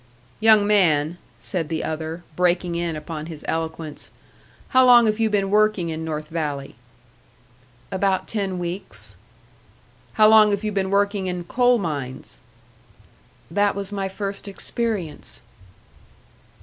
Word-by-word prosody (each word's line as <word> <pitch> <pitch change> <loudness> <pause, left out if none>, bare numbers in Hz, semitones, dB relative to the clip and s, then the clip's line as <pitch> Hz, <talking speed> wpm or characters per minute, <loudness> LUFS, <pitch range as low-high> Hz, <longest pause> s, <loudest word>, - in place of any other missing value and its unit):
"Young 215 -1 +6
man," 175 -5 +2 0.2
said 165 -5 -4
the 160 -1 -2
other, 160 +2 -4
breaking 180 0 +1
in 170 -1 -2
upon 155 0 -6
his 160 -3 -9
eloquence, 160 -1 -4 0.6
"how 260 0 +5
long 245 -2 +7
have 215 0 +1
you 225 -1 +2
been 200 -2 0
working 210 -4 +2
in 160 0 -4
North 155 -1 -4
Valley?" 145 -4 -3 1.2
"About 190 0 0
ten 195 -4 -2
weeks." 175 +2 -3 1.0
"How 215 -1 +6
long 215 -1 +7
have 200 0 -1
you 215 - -1
been 195 -1 -1
working 200 -1 +1
in 180 -1 -3
coal 245 +6 +3
mines?" 145 - -5 1.1
"That 205 +3 +2
was 200 0 -4
my 195 -1 -2
first 200 +1 -5
experience." 200 -4 -4
190 Hz, 130 wpm, -23 LUFS, 160-210 Hz, 1.2 s, long